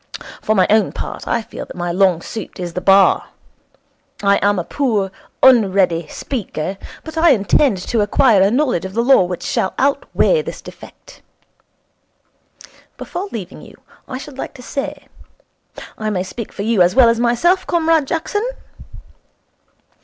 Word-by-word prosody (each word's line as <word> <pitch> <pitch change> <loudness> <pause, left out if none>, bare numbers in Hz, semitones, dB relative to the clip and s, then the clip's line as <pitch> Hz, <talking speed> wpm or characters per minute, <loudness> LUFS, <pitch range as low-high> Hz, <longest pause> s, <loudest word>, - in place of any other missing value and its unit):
For 215 - 0
my 185 -2 +4
own 215 0 +3
part, - - -7
I 230 - 0
feel - - -8
that - - -10
my 175 -1 -3
long 180 -2 +2
suit 220 -4 -8
is 175 -2 -5
the 180 - -3
Bar. 195 0 +4 1.0
I 200 0 +4
am 205 0 +2
a 175 - -1
poor, 215 -6 -1 0.3
unready 190 -9 +4
speaker, 195 - -5 0.2
but 320 0 -5
I 335 +1 +5
intend 210 +2 +2
to 230 -3 +1
acquire 210 0 +3
a 195 - +4
knowledge 250 - 0
of 190 +1 -7
the 230 - +1
Law 255 -7 +5
which 180 0 -5
shall 190 - -1
outweigh 285 - +1
this - - -7
defect. - - -14 1.8
Before 375 +3 -5
leaving 195 -5 -7
you, - - -15 0.3
I 255 - -5
should 275 0 -10
like - - -6
to 250 - -12
say 275 +2 -5 0.9
I 215 -1 -2
may 185 -3 -1
speak 210 +4 -7
for 200 - -6
you 220 -3 +1
as 175 +3 +3
well 255 -2 +7
as 230 0 +2
myself, 290 +11 +2
Comrade 325 -3 +2
Jackson 415 - -2
220 Hz, 160 wpm, -18 LUFS, 190-270 Hz, 1.8 s, well